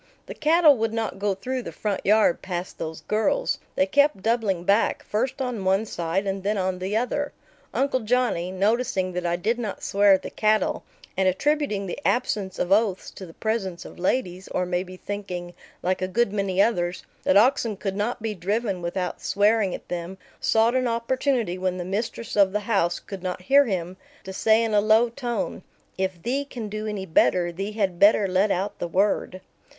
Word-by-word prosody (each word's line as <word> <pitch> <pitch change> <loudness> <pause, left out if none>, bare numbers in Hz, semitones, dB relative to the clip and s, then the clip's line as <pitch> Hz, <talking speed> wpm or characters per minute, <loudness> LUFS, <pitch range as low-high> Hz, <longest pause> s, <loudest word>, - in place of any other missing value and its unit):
The - - -7
cattle 315 -1 +5
would 225 0 -1
not 225 -3 -3
go 200 -1 0
through 255 +6 -3
the - - -7
front 205 -3 -3
yard 210 -3 +3
past 180 -1 -5
those 160 0 -5
girls. 220 - 0 0.2
They 185 - +3
kept 285 -1 +2
doubling 220 -6 +1
back, 200 +5 +2
first 255 +6 -2
on 245 -6 -3
one 190 +3 +2
side 175 0 -2
and 195 0 -2
then 205 +2 0
on 185 -1 -1
the 190 +4 -1
other. 280 +5 -1 0.4
Uncle 265 +1 +1
Johnny, 225 -6 0
noticing 195 -1 0
that 180 0 -2
I 170 - +1
did 220 +7 -1
not 220 -4 -5
swear 200 0 +4
at 190 - +1
the - - -6
cattle, 215 -2 +1 0.3
and 190 0 +2
attributing 215 0 0
the 180 - -5
absence 210 -8 0
of 180 - -2
oaths 200 -2 +2
to 190 - -10
the 165 - -14
presence 205 -6 -2
of - - -11
ladies, 185 -1 -1
or 180 - -1
maybe 180 +1 -3
thinking, 180 -3 -6 0.3
like 185 +1 0
a 185 - 0
good 210 +2 +1
many 195 -2 -1
others, 180 -5 +1 0.2
that 185 - +3
oxen 230 -2 +3
could 195 -1 -3
not 215 +3 -2
be 220 -1 -1
driven 200 +1 -2
without 180 +1 -3
swearing 205 -1 +2
at - - -11
them, 175 +2 -5 0.2
sought 225 +2 +3
an 255 -1 +1
opportunity, 235 -4 0
when 185 0 -1
the 175 - -4
mistress 220 +4 -3
of 195 -2 +4
the 210 - 0
house 195 -5 +1
could 195 -2 -9
not 180 0 -4
hear 280 +7 +5
him, 185 -4 -3 0.3
to 190 - -7
say 220 +3 +3
in 225 -1 -1
a 205 - +5
low 220 +3 +4
tone, 240 -5 -3 0.3
"If 185 -2 -3
thee 270 +4 0
can 235 -6 -7
do 215 +1 -4
any 205 -3 -4
better, 175 0 +2
thee 195 +5 -5
had 195 -5 -1
better 205 0 +5
let 190 +3 +2
out 195 +2 -2
the 175 - -2
word." 185 0 0
200 Hz, 195 wpm, -25 LUFS, 185-230 Hz, 0.4 s, cattle